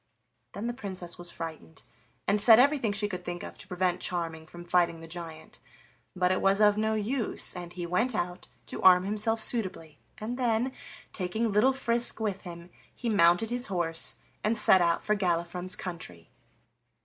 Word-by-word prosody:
Then 205 - -5
the 240 - -2
Princess 190 -8 -6
was 175 0 -6
frightened 160 - -8 0.4
and 205 0 +2
said 220 +1 +8
everything 270 -4 +3
she 205 0 -1
could 180 -3 -6
think 175 0 -5
of - - -8
to - - -8
prevent 180 0 -1
Charming 165 -2 -3
from 175 +2 -11
fighting 175 -1 +1
the 165 - -10
giant, 165 -2 -9 0.6
but 180 0 +1
it 185 - 0
was 195 +1 +3
of 210 -1 +5
no 220 +1 0
use, 220 +1 -2
and 175 -1 -7
he 175 -1 -6
went 220 +8 0
out 180 -3 -4 0.2
to - - -6
arm 180 -1 +7
himself 215 +3 0
suitably, 185 - 0 0.2
and 240 +4 -5
then, 240 +1 +1 0.4
taking 215 +5 -1
little 215 +6 +4
Frisk 240 -3 +3
with 205 -3 -2
him, 175 0 -10 0.2
he 240 - -5
mounted 180 +2 +3
his 245 +1 -1
horse 170 -4 +3 0.3
and 220 +2 +1
set 190 -3 +5
out 170 -1 +1
for 210 - +1
Galifron's 180 -1 0
country. 90 - -8
185 Hz, 175 wpm, -28 LUFS, 175-220 Hz, 0.6 s, said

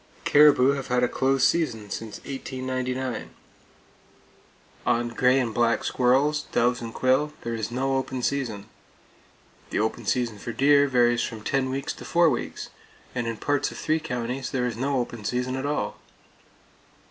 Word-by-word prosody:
Caribou 145 -3 +6
have 140 -1 -3
had 125 0 +1
a - - +4
close 135 +2 +1
season 115 -11 +1
since 110 -2 -5
1899. 130 -2 -4 1.5
On 120 0 +1
gray 125 +3 +3
and 120 -4 -1
black 115 0 +2
squirrels, 140 +4 +2
doves 125 +1 +2
and 115 -1 -5
quail, 130 +5 +1
there 115 - -4
is 110 -2 -3
no 135 +2 0
open 130 -1 -3
season. 120 -8 -2 1.0
The - - -2
open 110 0 -2
season 120 -4 0
for 120 - -5
deer 145 +2 +5
varies 120 -2 +3
from 110 -2 -4
ten 135 +1 0
weeks 135 +1 -3
to - - -11
four 170 -2 +3
weeks, 120 - -4 0.4
and 120 -2 -2
in 115 -1 -3
parts 145 +3 0
of - - -10
three 160 0 0
counties 125 -1 -3
there 125 -2 -1
is 120 -3 -2
no 135 +3 -1
open 120 -3 -3
season 125 +3 -1
at 135 +2 -3
all. 150 - -2
130 Hz, 160 wpm, -25 LUFS, 120-135 Hz, 1.5 s, Caribou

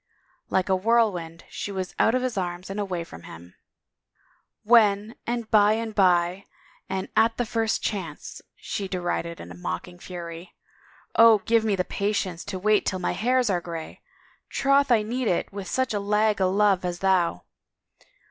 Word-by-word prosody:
Like 185 - +1
a 190 - +3
whirlwind 185 -6 +1
she 205 - -6
was 190 -2 -4
out 225 - +4
of 255 - 0
his 255 -3 -2
arms 180 0 -4
and 200 - -4
away 185 -4 -2
from 85 - -12
him. 85 +1 -12 0.6
" - - -40
When 210 -1 +5
and 235 -1 -2
hy 210 0 +6
and 225 0 -3
by 180 -1 +2 0.4
and 190 0 -3
at 225 +1 +3
the 245 - 0
first 225 0 -1
chance," 180 -8 -5
she 200 - -5
derided 175 -2 -3
in 85 +1 -9
mocking 90 - -5
fury. 170 -1 -8 0.3
" - - -29
Oh, 230 -1 +8
God 200 - -19
give 230 -1 +3
me 210 -3 +1
patience 190 -2 -2
to 205 -2 -4
wait 210 +2 +2
till 190 - -1
my 180 - -1
hairs 250 0 +1
are 175 -2 0
grayl 165 -2 -7 0.5
Troth 275 0 +2
I 225 -3 +4
need 240 +3 -2
it 180 +1 -1
with 200 -1 -6
such 260 -3 -1
a 205 - 0
lag 210 0 +1
o' 185 - +3
love 195 -1 +2
as 175 -1 -2
thou! 180 - +1
195 Hz, 175 wpm, -25 LUFS, 175-220 Hz, 0.6 s, Oh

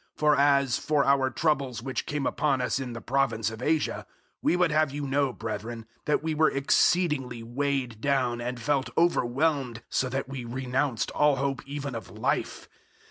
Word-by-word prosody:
001:008 - - -42
For 150 -1 +4
as 140 -2 +3
for 150 -2 +1
our 135 -1 +3
troubles 135 -5 0
which 130 -2 -3
came 145 -3 -2
upon 140 -1 +1
us 125 +2 0
in 125 -3 -5
the 115 - -7
province 115 -5 0
of 110 - -9
Asia, 155 -1 0 0.3
we - - +2
would 180 -2 +2
have 155 0 +3
you 145 +1 -4
know, 140 0 +1
brethren, 115 0 -5 0.2
that 150 0 +1
we 160 -1 -1
were 155 +1 +4
exceedingly 140 -3 +1
weighed 125 -2 -2
down, 125 -4 +1
and 125 +1 -4
felt 140 +1 0
overwhelmed, 135 -5 +1
so 130 - +1
that 135 +1 -3
we 135 -2 -6
renounced 130 0 -1
all 150 -1 +3
hope 135 -1 -1
even 140 -1 -4
of 115 -5 -6
life. - - -2
135 Hz, 180 wpm, -27 LUFS, 120-145 Hz, 0.3 s, For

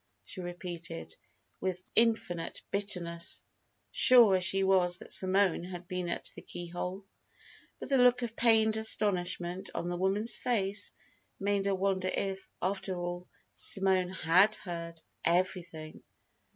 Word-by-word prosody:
she 185 - -9
repeated, 175 - -7 0.4
with 185 -1 -4
infinite 220 -7 0
bitterness, 175 -4 0 0.5
sure 235 -6 +8
as 185 - 0
she 195 +1 +2
was 185 -2 +2
that - - -11
Simone 190 -2 +1
had 180 -1 -9
been 180 -1 -4
at - - -2
the - - -10
keyhole. 175 +2 -7 0.7
But - - -8
the 270 -2 +2
look 250 0 +4
of 230 -1 -5
pained 220 -2 +3
astonishment 185 -4 +2
on 170 +1 -3
the 175 - -3
woman's 195 +5 0
face 205 -4 -2 0.5
made 200 0 -1
her 195 - +1
wonder 190 -1 -1
if, 195 0 -4
after 190 0 -2
all, 175 0 -5 0.3
Simone 190 -2 +3
had 185 +4 +3
heard 170 -2 -7 0.2
"everything." 170 -3 -2
185 Hz, 130 wpm, -30 LUFS, 175-200 Hz, 0.7 s, sure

